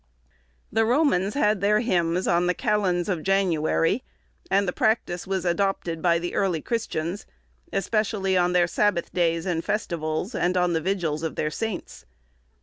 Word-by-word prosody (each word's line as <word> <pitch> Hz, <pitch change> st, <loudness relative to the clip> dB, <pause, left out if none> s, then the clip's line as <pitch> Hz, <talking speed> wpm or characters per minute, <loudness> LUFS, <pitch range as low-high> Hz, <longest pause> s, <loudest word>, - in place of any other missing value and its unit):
The 225 Hz, +1 st, +2 dB
Romans 230 Hz, -, +2 dB
had 210 Hz, -8 st, +2 dB
their 210 Hz, +2 st, +3 dB
hymns 180 Hz, -5 st, 0 dB
on 175 Hz, +1 st, +2 dB
the 180 Hz, -, +1 dB
calends 200 Hz, -7 st, 0 dB
of 180 Hz, -5 st, -1 dB
January, 185 Hz, +2 st, +1 dB, 0.5 s
and 200 Hz, 0 st, +2 dB
the 180 Hz, -, -1 dB
practice 220 Hz, -6 st, 0 dB
was 190 Hz, -2 st, -2 dB
adopted 175 Hz, -2 st, -1 dB
by 170 Hz, -1 st, +3 dB
the 175 Hz, +1 st, -4 dB
early 185 Hz, -5 st, +1 dB
Christians, 185 Hz, -3 st, -3 dB, 0.4 s
especially 200 Hz, -2 st, 0 dB
on 180 Hz, 0 st, +2 dB
their 175 Hz, -1 st, +4 dB
Sabbath 180 Hz, 0 st, 0 dB
days 165 Hz, -1 st, +1 dB
and 170 Hz, -3 st, -1 dB
festivals, 170 Hz, 0 st, -2 dB
and 180 Hz, -2 st, 0 dB
on 180 Hz, -1 st, +2 dB
the 160 Hz, -, 0 dB
vigils 170 Hz, -5 st, -1 dB
of 160 Hz, -1 st, -3 dB
their 155 Hz, -, -1 dB
saints. 215 Hz, -, -5 dB
180 Hz, 155 wpm, -25 LUFS, 170-205 Hz, 0.5 s, their